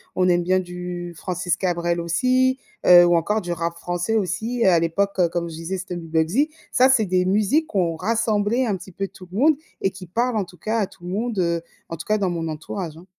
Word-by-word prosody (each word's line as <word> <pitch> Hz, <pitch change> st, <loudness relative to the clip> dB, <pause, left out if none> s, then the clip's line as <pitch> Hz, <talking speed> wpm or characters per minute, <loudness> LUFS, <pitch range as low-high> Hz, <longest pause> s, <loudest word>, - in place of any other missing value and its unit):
On 185 Hz, 0 st, +2 dB
aime 175 Hz, 0 st, +3 dB
bien 185 Hz, +2 st, +2 dB
du 180 Hz, -1 st, -6 dB
Francis 180 Hz, +1 st, -2 dB
Cabrel 175 Hz, -2 st, 0 dB
aussi, 255 Hz, +10 st, +2 dB, 0.3 s
heu, 175 Hz, -1 st, +9 dB
ou 175 Hz, 0 st, +4 dB
encore 210 Hz, +6 st, +1 dB
du 175 Hz, -2 st, -5 dB
rap 170 Hz, 0 st, -2 dB
français 175 Hz, +5 st, -2 dB
aussi, 220 Hz, +4 st, -1 dB
à 180 Hz, -3 st, +5 dB
l'époque, 195 Hz, +4 st, 0 dB
comme 170 Hz, -1 st, -2 dB
je 160 Hz, -, -8 dB
disais, 165 Hz, +4 st, -4 dB
c'était 180 Hz, 0 st, -6 dB
Stomy 170 Hz, -1 st, -7 dB
Bugsy. 165 Hz, -, +1 dB, 0.2 s
Ça, 255 Hz, +1 st, +5 dB
c'est 250 Hz, -5 st, +4 dB
des 180 Hz, -1 st, +1 dB
musiques 215 Hz, -, +2 dB
qui 205 Hz, -, -3 dB
ont 170 Hz, -3 st, +1 dB
rassemblé 220 Hz, +4 st, +1 dB
un 205 Hz, -, 0 dB
petit 185 Hz, +1 st, -12 dB
peu 195 Hz, +2 st, -3 dB
tout 185 Hz, -1 st, -14 dB
le 190 Hz, -, -6 dB
monde 305 Hz, +3 st, +5 dB, 0.3 s
et 195 Hz, -, +2 dB
qui 190 Hz, 0 st, -10 dB
parlent, 235 Hz, +6 st, 0 dB
en 205 Hz, -, 0 dB
tout 180 Hz, 0 st, -16 dB
cas, 220 Hz, +5 st, -2 dB
à 210 Hz, -, +2 dB
tout 175 Hz, -, -20 dB
le -, -, -5 dB
monde, 220 Hz, +3 st, -2 dB
heu, 170 Hz, -1 st, +1 dB, 0.3 s
en 165 Hz, -, -5 dB
tout 165 Hz, -, -8 dB
cas 215 Hz, -, +2 dB
dans 195 Hz, -2 st, +1 dB
mon 165 Hz, -2 st, -3 dB
entourage, 160 Hz, +2 st, -5 dB
hein. 170 Hz, -, -14 dB
185 Hz, 240 wpm, -22 LUFS, 170-215 Hz, 0.3 s, heu